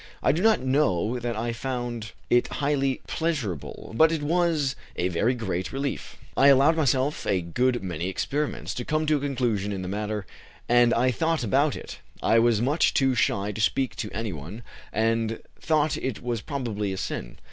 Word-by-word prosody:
I - - +5
do 160 +5 -1
not 220 +1 +4
know 125 - +1
that 120 -1 -3
I 115 +2 -2
found 120 -3 -4 0.2
it 120 - +4
highly 140 -2 0
pleasurable, 130 - -3
but 160 +6 +5
it 160 -3 -1
was 160 -4 +1 0.2
a 90 - 0
very 110 +9 +1
great 95 -6 -3
relief. 140 +1 -4 0.2
I 140 - +5
allowed 140 +4 +6
myself 140 -1 +1
a 95 - +2
good 120 +8 0
many 90 -2 -3
experiments, 145 +9 -2
to 125 - -4
come 155 +4 0
to 155 -1 +3
a - - -3
conclusion 120 -8 -1
in 95 -2 -4
the - - -4
matter, 105 +1 -3 0.4
and 120 0 +5
I 125 +3 +3
thought 160 +2 0
about 135 +6 +2
it. - - -8 0.2
I 115 - +5
was 115 -1 +3
much 145 +6 +2
too 135 -2 +3
shy 105 -3 +1
to 105 - -4
speak 130 +3 +1
to 105 - -3
any 110 -2 -3
one, 85 +10 -8 0.3
and 115 +1 0 0.2
thought 155 -2 +1
it 130 -4 -4
was 120 -3 -2
probably 110 -9 -3
a 95 - -4
sin. - - -5
120 Hz, 185 wpm, -26 LUFS, 105-140 Hz, 0.4 s, allowed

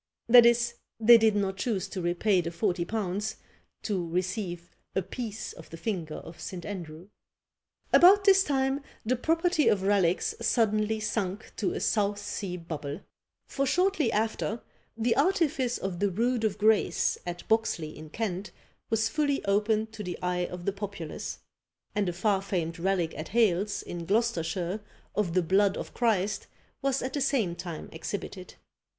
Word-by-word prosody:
That 240 0 +9
is, 235 0 +3 0.3
they 230 +1 +8
did 220 -1 +4
not 195 -2 0
choose 195 -2 -1
to 190 - -4
repay 175 +3 +2
the 170 - -3
forty 170 0 -1
pounds, 210 +1 -2 0.5
to 185 -6 -2
receive 180 0 -3 0.2
apiece 215 +3 -4
of 165 - -13
the 165 - -8
finger 165 -5 -3
of 165 - -10
St. 180 -2 -6
Andrew. 175 -2 -7 0.8
About 390 +3 +8
this 390 -1 +6
time 270 -2 0 0.2
the 250 +3 +2
property 325 +4 +2
of 195 -2 +3
relics 190 -3 +2
suddenly 220 -1 +2
sunk 210 -2 -3
to 190 -5 0
a - - -3
South 205 -2 +1
sea 200 -2 -4
bubble; 155 -1 -6 0.4
for 275 0 -1
shortly 360 -5 +2
after 220 +1 -1 0.3
the 230 +1 +2
artifice 280 -6 +2
of 185 -3 -4
the 200 0 +2
Rood 230 +5 0
of 210 -2 0
Grace, 215 0 +2
at 175 0 -6
Boxley, 175 -8 0
in 155 0 -10
Kent, 200 0 -3 0.4
was 220 0 +2
fully 285 +1 0
opened 215 +2 +1
to 220 - -7
the 180 -2 -4
eye 180 0 0
of 180 -1 -8
the 200 - 0
populace; 195 -5 -6 0.6
and 205 -3 +1
a - - -3
far 195 +2 +1
famed 170 -4 -2
relic 180 -2 0
at 155 - -5
Hales, 210 -3 +1
in 170 -1 -6
Gloucestershire, 190 -3 0 0.3
of 185 -5 -1
the 185 - +3
blood 195 +3 +3
of - - -6
Christ, 210 -4 0 0.3
was 275 -1 0
at 260 - -3
the 285 - -1
same 235 -11 +1
time 175 -3 -6
exhibited. 185 +2 -6
205 Hz, 160 wpm, -28 LUFS, 180-230 Hz, 0.8 s, That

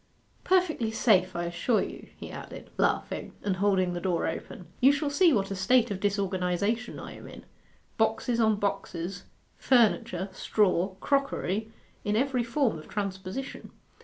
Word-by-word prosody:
'Perfectly 355 -11 +2
safe, 190 -5 +3
I 170 - -1
assure 175 +7 +1
you,' - - -8
he - - -8
added, - - -9
laughing, - - -1
and 195 -2 0
holding 190 -2 +2
the 175 - -4
door 180 -2 0
open. 170 +2 -5
'You 265 +3 +7
shall 290 0 -1
see 340 +4 +5
what 200 -6 +1
a - - -2
state 235 +5 +3
of 195 - -3
disorganization 200 +3 -1
I - - -8
am - - -11
in - - -11 0.5
boxes 225 +2 +1
on 220 -2 +4
boxes, 185 -3 -3 0.3
furniture, 230 -6 +3
straw, 190 -1 +1
crockery, 220 -7 0 0.3
in 210 0 0
every 255 +1 +1
form 235 - 0
of 155 - -13
transposition. 195 +5 -5
205 Hz, 150 wpm, -28 LUFS, 185-245 Hz, 0.5 s, You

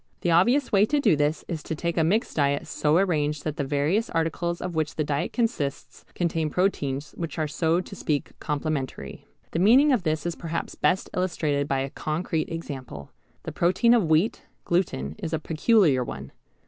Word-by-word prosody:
The 175 - +1
obvious 240 - +3
way 205 +1 +4
to 295 - +1
do 210 - +4
this 150 +2 0
is 165 -4 -4
to 160 - -4
take 170 +2 -2
a 165 - +2
mixed 205 +9 0
diet 140 -1 +1
so 150 +2 +1
arranged 150 -6 +1
that 155 -1 -3
the 145 - 0
various 150 +11 0
articles 170 +1 -1
of 180 -1 -4
which 155 -2 -1
the 155 - 0
diet 145 -1 -1
consists 225 - -2
contain 165 -3 0
proteins 150 -5 -1
which 165 -1 -6
are 155 -1 0
so 165 +4 +1
to 195 - -10
speak 150 -6 -2
complementary. 150 -2 -4 0.2
The 165 - -1
meaning 255 +10 +6
of 245 - +2
this 155 -2 -1
is 175 - -1
perhaps 165 0 -4
best 190 - 0
illustrated 155 -6 0
by 135 -1 0
a 135 0 -4
concrete 160 +1 -2
example. 135 - -7 0.3
The - - -5
protein 185 +7 +3
of 210 -9 +2
wheat, 160 +7 +2 0.2
gluten, 120 - 0
is 165 - -4
a - - +2
peculiar 155 - +3
one. - - -7
160 Hz, 185 wpm, -25 LUFS, 150-180 Hz, 0.3 s, meaning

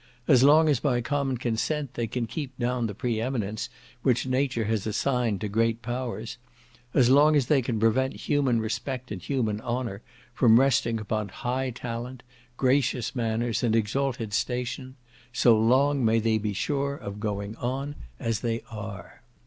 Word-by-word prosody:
As 130 -5 +6
long 155 +3 +6
as 145 -5 +3
by 125 -4 +1
common 135 +1 -1
consent 125 +4 -2
they 120 -1 -2
can 120 +2 -2
keep 130 +1 -6
down 125 -1 0
the 105 - -6
pre 115 0 -1
eminence 110 -4 -2 0.3
which 125 -1 +2
nature 130 -2 0
has 110 -1 -1
assigned 115 -2 0
to 105 - -1
great 115 +2 0
powers, 120 -1 -4 0.6
as 130 -3 +5
long 150 +3 +6
as 140 -4 +3
they 140 +1 +3
can 115 -3 -2
prevent 120 +4 +2
human 135 -5 +1
respect 125 +3 -4
and 95 -4 -5
human 110 -3 -1
honour 120 -4 -3 0.3
from 115 -2 +6
resting 120 -4 +2
upon 105 -1 -2
high 130 +6 -2
talent, 125 +1 -6 0.3
gracious 130 -1 +1
manners, 115 -2 -1
and 115 -2 +2
exalted 115 0 -1
station, 125 +2 -2 0.4
so 120 -1 +5
long 130 +5 +3
may 115 0 +3
they 110 -1 +2
be 105 0 -2
sure 140 +6 -1
of 100 -6 -7
going 105 0 -3
on 135 +4 -3 0.3
as 115 -1 -1
they 115 -1 -2
are. 105 -2 -8
120 Hz, 165 wpm, -27 LUFS, 110-130 Hz, 0.6 s, As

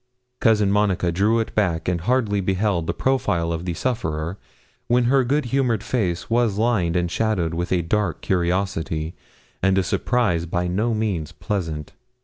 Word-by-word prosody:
Cousin 105 -4 +3
Monica 100 -4 +2
drew 105 +6 +2
it 115 - -3
back 85 -7 0
and 90 -2 0
hardly 105 -1 +1
beheld 95 -2 0
the - - +1
profile 90 -11 0
of 85 +1 -4
the 85 -2 -2
sufferer, 85 -7 -2 0.5
when 120 +1 +3
her 130 +2 +3
good 140 +3 +1
humoured 125 -6 +1
face 90 -9 -1
was 115 -3 +1
lined 105 -7 +1
and 90 -1 0
shadowed 100 -7 0
with 85 +1 -3
a 90 -2 +2
dark 105 +5 -1
curiosity 85 -3 -1 0.5
and 95 0 +3
a 95 - +3
surprise 90 -4 0
by 90 +1 -1
no 110 +6 0
means 100 -8 -2
pleasant. 80 -7 -4
95 Hz, 160 wpm, -23 LUFS, 85-110 Hz, 0.5 s, Cousin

